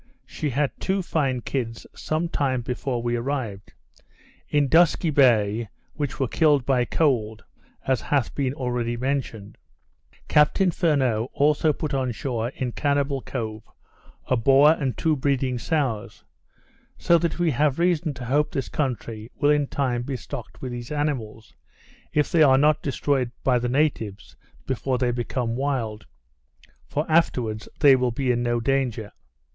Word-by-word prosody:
She 150 - -4
had 140 +2 0
two 190 0 -1
fine 135 -7 -1
kids, 115 -3 -4
some 155 +2 -2
time 130 -6 -1
before 125 0 -3
we 120 0 0
arrived 115 -6 -4 0.8
in 145 -1 +2
Dusky 165 +2 +4
Bay, 115 -5 +3 0.2
which 145 -3 -4
were 135 - +1
killed 145 -1 +2
by 130 -2 +2
cold, 115 -8 0 0.4
as 130 -3 +1
hath 140 -5 0
been 135 -1 -1
already 120 -2 -2
mentioned. 120 -6 -3 0.7
Captain 175 +5 +3
Furneaux 130 - +1
also 150 +2 +3
put 150 0 -4
on 130 -2 0
shore, 120 -2 -3
in 125 -2 -3
Cannibal 140 0 0
Cove, 110 -5 -5 0.6
a 130 - +1
boar 135 +5 +5
and 140 -5 -1
two 160 -1 +1
breeding 130 -2 0
sows; 130 -8 -2 0.7
so 170 0 +3
that 170 -1 -1
we 175 -2 +2
have 140 +1 +1
reason 170 -2 +1
to 125 0 -7
hope 145 +5 +1
this 135 - -3
country 115 -5 -3
will 145 - +2
in 145 -1 +2
time 130 -4 -1
be 135 +2 -4
stocked 125 +1 -9
with 130 - -4
these 120 +1 -7
animals, 130 -8 -3 0.6
if 150 -1 +1
they 170 -3 +3
are 135 -3 +6
not 150 +2 +3
destroyed 140 -2 0
by 125 -2 +3
the 120 0 -2
natives 120 -7 -1 0.3
before 130 0 -1
they 125 -1 +1
become 120 -1 -2
wild; 120 -6 -2 0.8
for, 150 +2 -2
afterwards, 125 -9 +1
they 140 -3 +8
will 125 -1 +1
be 125 +2 0
in 120 0 0
no 120 0 0
danger. 120 -4 -1
130 Hz, 150 wpm, -24 LUFS, 120-145 Hz, 0.8 s, they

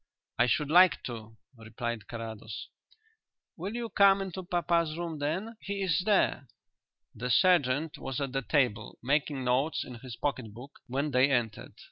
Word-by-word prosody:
"I 120 - +5
should 150 +3 +1
like 180 +2 +6
to," 110 -2 -7 0.2
replied 115 -1 -5
Carrados. 110 -2 -7 0.9
"Will 195 +6 -5
you 235 -1 -3
come 200 -2 +5
into 190 -1 -4
papa's 170 -2 0
room 170 -3 -4
then? 185 +10 -2
He 200 0 -3
is 165 -5 +2
there." 190 -10 +2 0.7
The 125 +3 -4
sergeant 155 -2 +3
was 135 -2 -4
at 140 -2 -2
the 135 +1 -1
table, 125 -6 0
making 140 0 0
notes 130 +5 +1
in 125 -2 -9
his 125 -1 -8
pocket 115 -4 -3
book, 130 +5 -12
when 140 +4 -1
they 130 +2 +4
entered. 120 -5 -1
140 Hz, 155 wpm, -30 LUFS, 120-170 Hz, 0.9 s, like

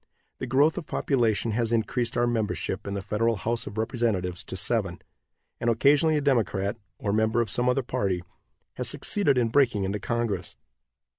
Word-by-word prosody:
The 130 - -4
growth 140 +5 +3
of 155 - -11
population 115 -4 +1
has 115 +1 0
increased 115 +1 0
our 120 - +3
membership 110 -4 -2
in 100 - -3
the 100 - -4
federal 115 +4 +1
house 115 +4 -2
of 105 - -8
representatives 110 -6 -1
to 95 - -5
seven, 95 -4 0 0.6
and 120 - +1
occasionally 145 +7 +4
a - - 0
Democrat, 110 -6 +1 0.2
or 100 - -2
member 110 +2 +2
of 115 -4 0
some 125 +3 +2
other 130 +1 +1
party, 95 -6 -1 0.5
has - - +1
succeeded 170 -10 +1
in 120 -2 +2
breaking 120 -6 +3
into 100 +2 -2
congress. 115 -2 -2
115 Hz, 170 wpm, -26 LUFS, 100-125 Hz, 0.6 s, occasionally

